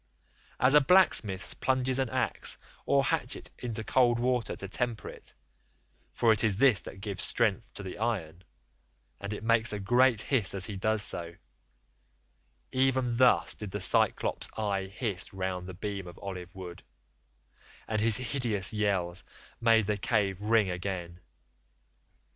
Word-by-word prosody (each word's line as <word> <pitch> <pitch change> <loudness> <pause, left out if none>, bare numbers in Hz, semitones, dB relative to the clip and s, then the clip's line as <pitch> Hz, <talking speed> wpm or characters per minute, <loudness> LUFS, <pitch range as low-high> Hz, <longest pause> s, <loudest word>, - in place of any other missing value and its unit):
As 130 +2 +4
a 150 - +7
blacksmith 130 - +3
plunges 130 0 +1
an 130 -3 0
axe - - -1 0.3
or 140 -1 +3
hatchet 120 - -2
into 115 -2 -3
cold 120 0 +3
water 125 0 -1
to 100 - -7
temper 115 +2 -3
it—for 115 - -5
it 105 - -1
is 105 -4 +1
this 120 -8 +4
that 95 +4 -11
gives 100 -2 -2
strength 115 -1 +1
to 105 - -4
the 95 0 -8
iron—and 80 - -7
it 105 - -6
makes 115 0 +2
a 105 - -3
great 120 +3 +3
hiss 115 -8 0
as 95 -1 0
he 105 - -6
does 110 +2 +1
so, 85 -2 -1 1.4
even 130 -2 +1
thus 125 0 +4
did 105 - -8
the 100 - -4
Cyclops' 95 - +2
eye 100 -3 -1
hiss 100 -1 -4
round 95 -1 -3
the 95 - -8
beam 100 -1 -5
of 85 - -11
olive 90 -3 -7
wood, 90 -1 -9 1.1
and 110 -1 -1
his 110 -1 +5
hideous 120 -6 -1
yells 95 -4 -1 0.4
made 115 -2 +4
the 105 0 -1
cave 100 -2 0
ring 105 -2 +2
again. 90 -1 -5
105 Hz, 145 wpm, -29 LUFS, 95-120 Hz, 1.4 s, a